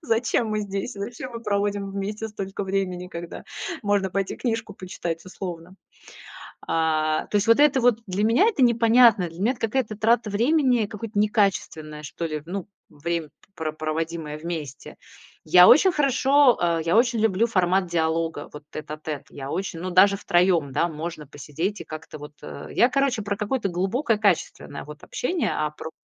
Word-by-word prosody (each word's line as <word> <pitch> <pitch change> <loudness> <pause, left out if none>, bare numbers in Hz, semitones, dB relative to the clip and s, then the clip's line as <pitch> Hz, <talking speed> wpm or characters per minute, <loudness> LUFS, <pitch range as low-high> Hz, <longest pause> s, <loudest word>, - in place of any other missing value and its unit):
Зачем 230 -3 +1
мы 215 0 -1
здесь? 200 +4 -4
Зачем 230 +5 -6
мы 230 - -6
проводим 200 -2 -1
вместе 205 +3 -4
столько 200 -2 -5
времени, 190 -2 -2
когда 170 -1 -8 0.4
можно 205 -2 +1
пойти 195 +1 -2
книжку 225 -4 -3
почитать 175 -3 -5
условно? 180 -1 -8 0.9
А, 155 -1 +1
то - - 0
есть 205 - +1
вот 230 +4 +5
это 290 -3 +5
вот 240 -2 +3
для 195 +3 0
меня 230 - +4
это 390 - 0
непонятно. 230 -4 +5
Для 165 +1 -13
меня 225 +6 +2
это 255 - -15
какая-то 225 -1 -1
трата 225 +1 +2
времени, 245 +1 +2
какое-то 210 +1 -8
некачественное 195 -8 0
что 160 +3 -5
ли, 155 -2 -4
ну, 190 +1 -5 0.2
время, 165 +1 -3
п - - -39 0.2
про 160 -2 -3
проводимое 155 0 -4
вместе. 155 -4 -6 0.5
Я 180 0 +8
очень 375 +4 +7
хорошо, 275 -2 +4
э 170 -1 +1
я 170 +4 +2
очень 235 -1 +3
люблю 220 0 +2
формат 185 -3 +1
диалога 165 -2 -1
вот 150 0 -10
тет-а-тет. 155 -1 -6
Я 135 -1 -7
очень 180 0 -3
ну, 185 +2 -4
даже 195 +2 +5
втроём, 175 -7 +2
да, 170 - +1
можно 155 -1 -6
посидеть 160 +8 -4
и - - -6
как-то 155 0 -9
вот, 150 0 -10
э - - -8
я, 240 - +4
короче, 260 -3 0
про 200 0 -2
какое-то 210 +1 -1
глубокое, 205 - 0
качественное 195 -7 -1
вот 150 +1 -11
общение, 340 +5 -1
а 150 0 -1
про 155 +1 -8
195 Hz, 170 wpm, -24 LUFS, 165-225 Hz, 0.9 s, Я